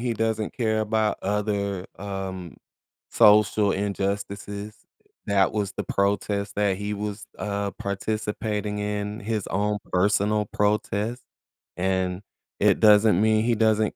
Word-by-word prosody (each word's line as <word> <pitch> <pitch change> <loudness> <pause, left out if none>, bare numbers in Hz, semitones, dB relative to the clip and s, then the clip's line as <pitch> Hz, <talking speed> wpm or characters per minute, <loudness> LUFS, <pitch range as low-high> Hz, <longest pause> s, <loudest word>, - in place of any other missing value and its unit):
he 120 -1 -1
doesn't 110 -1 -1
care 110 -3 +1
about 110 0 0
other, 100 -2 -1
um, 95 -3 -6 0.5
social 105 -1 +5
injustices. 100 +1 -3 0.5
That 100 -1 +3
was 105 -3 -1
the - - -1
protest 100 0 -1
that 100 -2 +1
he 105 +1 -3
was, 105 +1 -5
uh, 100 -1 -2
participating 105 +1 -3
in, 105 0 -3
his 105 -1 -2
own 105 +2 0
personal 105 +3 +2
protest. 105 +3 -1 0.6
And 95 0 0 0.4
it - - +4
doesn't 105 -2 +6
mean 110 0 +3
he 120 0 +2
doesn't 110 -1 +2
105 Hz, 120 wpm, -25 LUFS, 100-105 Hz, 0.6 s, doesn't